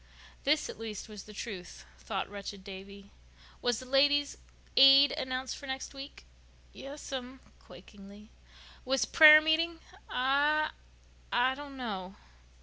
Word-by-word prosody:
This, 300 Hz, +2 st, +1 dB
at -, -, -10 dB
least, 220 Hz, -2 st, -7 dB
was 210 Hz, -2 st, -11 dB
the 215 Hz, -, -13 dB
truth, 200 Hz, -5 st, -8 dB
thought 195 Hz, -3 st, -4 dB
wretched 200 Hz, -1 st, -9 dB
Davy. 200 Hz, +1 st, -12 dB, 0.5 s
"Was 245 Hz, -2 st, 0 dB
the 255 Hz, -, -10 dB
Ladies' 285 Hz, +2 st, +2 dB, 0.4 s
Aid 275 Hz, +1 st, +7 dB
announced 260 Hz, 0 st, -4 dB
for 280 Hz, -, -11 dB
next 265 Hz, +1 st, -6 dB
week?" 275 Hz, +1 st, -11 dB, 0.5 s
"Yes'm"—quakingly. 250 Hz, -7 st, -11 dB, 0.5 s
"Was 265 Hz, +1 st, 0 dB
prayer 310 Hz, -1 st, +8 dB
meeting?" 325 Hz, +2 st, 0 dB, 0.3 s
"I—I 275 Hz, -2 st, -1 dB
don't 280 Hz, 0 st, -10 dB
know." 195 Hz, -6 st, -6 dB
260 Hz, 115 wpm, -30 LUFS, 205-285 Hz, 0.5 s, prayer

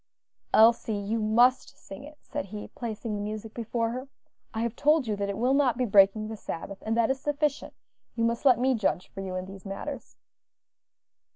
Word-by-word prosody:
"Elsie, 225 Hz, -1 st, +5 dB
you 205 Hz, +3 st, -2 dB
must 240 Hz, +4 st, +3 dB
sing 195 Hz, +7 st, -11 dB
it," 300 Hz, +1 st, -12 dB
said -, -, -4 dB
he, 210 Hz, +1 st, -8 dB
placing 225 Hz, -2 st, -5 dB
the 205 Hz, -, -3 dB
music 215 Hz, +1 st, -5 dB
before 230 Hz, 0 st, -2 dB
her. 255 Hz, +3 st, -5 dB, 0.4 s
"I 225 Hz, -, -3 dB
have 235 Hz, -1 st, -2 dB
told 300 Hz, -1 st, +3 dB
you 215 Hz, -2 st, -1 dB
that 200 Hz, 0 st, -2 dB
it 200 Hz, -, -3 dB
will 250 Hz, +3 st, +2 dB
not 275 Hz, -4 st, +3 dB
be 255 Hz, -, +1 dB
breaking 200 Hz, 0 st, +4 dB
the 220 Hz, -, -5 dB
Sabbath, 195 Hz, -1 st, -7 dB
and 225 Hz, +1 st, -1 dB
that 235 Hz, +1 st, +3 dB
is 265 Hz, -, -2 dB
sufficient; 295 Hz, 0 st, -1 dB, 0.4 s
you 230 Hz, -, -1 dB
must 230 Hz, 0 st, 0 dB
let 260 Hz, -5 st, +6 dB
me 260 Hz, +2 st, +2 dB
judge 195 Hz, -5 st, -1 dB
for 195 Hz, -, -6 dB
you 190 Hz, -1 st, -5 dB
in 185 Hz, 0 st, -3 dB
these 195 Hz, 0 st, -11 dB
matters." 245 Hz, +7 st, -7 dB
225 Hz, 200 wpm, -27 LUFS, 205-255 Hz, 0.4 s, let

